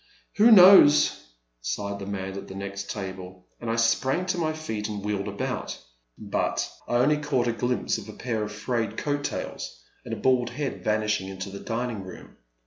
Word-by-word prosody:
" -, -, -38 dB
Who 215 Hz, +3 st, +7 dB
knows," 185 Hz, -, +7 dB, 0.3 s
sighed 100 Hz, +11 st, -3 dB
the 100 Hz, -, -7 dB
man 95 Hz, -1 st, -4 dB
at 100 Hz, -, -7 dB
the 95 Hz, -, -9 dB
next 100 Hz, 0 st, -6 dB
table, 95 Hz, -2 st, -7 dB
and 120 Hz, -, -5 dB
I 115 Hz, -, +1 dB
sprang 130 Hz, +9 st, +2 dB
to 185 Hz, -1 st, -1 dB
my 160 Hz, -2 st, +1 dB
feet 110 Hz, -10 st, -4 dB
and 105 Hz, -1 st, -5 dB
wheeled 105 Hz, -1 st, -2 dB
about. 100 Hz, 0 st, -4 dB, 0.4 s
But -, -, -1 dB, 0.2 s
I -, -, -1 dB
only 140 Hz, +5 st, +4 dB
caught 140 Hz, -5 st, 0 dB
a 120 Hz, -, +1 dB
glimpse 120 Hz, +1 st, -1 dB
of 110 Hz, 0 st, -11 dB
a -, -, -8 dB
pair 115 Hz, -2 st, -3 dB
of 105 Hz, 0 st, -3 dB
frayed 110 Hz, +1 st, -2 dB
coat 145 Hz, -1 st, -1 dB
tails -, -, -5 dB, 0.2 s
and -, -, -8 dB
a -, -, -2 dB
bald 125 Hz, -2 st, +2 dB
head 135 Hz, +2 st, -4 dB
vanishing 105 Hz, -2 st, 0 dB
into 95 Hz, 0 st, -6 dB
the 100 Hz, -, -7 dB
dining 115 Hz, -3 st, -3 dB
room. 95 Hz, -, -12 dB
110 Hz, 195 wpm, -26 LUFS, 100-130 Hz, 0.4 s, Who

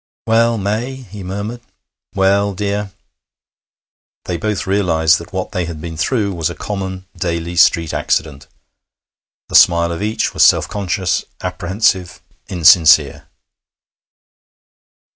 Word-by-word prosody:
'Well, 115 Hz, +1 st, +2 dB
May?' 110 Hz, +6 st, -2 dB
he 105 Hz, -6 st, -11 dB
murmured. 100 Hz, +6 st, -5 dB, 0.5 s
'Well, 100 Hz, +1 st, +2 dB
dear.' 100 Hz, +1 st, -3 dB, 1.3 s
They 90 Hz, -, -3 dB
both 105 Hz, +4 st, -3 dB
realized 80 Hz, -5 st, +2 dB
that 85 Hz, -, -12 dB
what 95 Hz, -1 st, -4 dB
they 90 Hz, -1 st, -2 dB
had 80 Hz, -2 st, -7 dB
been 80 Hz, +1 st, -7 dB
through 100 Hz, +4 st, -1 dB
was 85 Hz, -2 st, -2 dB
a 85 Hz, -, -7 dB
common, 95 Hz, -2 st, -5 dB
daily 85 Hz, -1 st, -3 dB
street 85 Hz, -1 st, +3 dB
accident. 70 Hz, -3 st, -2 dB, 1.0 s
The -, -, -11 dB
smile 85 Hz, -1 st, +5 dB
of 85 Hz, -, -5 dB
each 110 Hz, +2 st, -1 dB
was -, -, -1 dB
self -, -, +4 dB
conscious, 95 Hz, -3 st, -2 dB, 0.2 s
apprehensive, 90 Hz, -1 st, -1 dB, 0.3 s
insincere. 80 Hz, -4 st, +4 dB
95 Hz, 120 wpm, -17 LUFS, 85-100 Hz, 1.3 s, smile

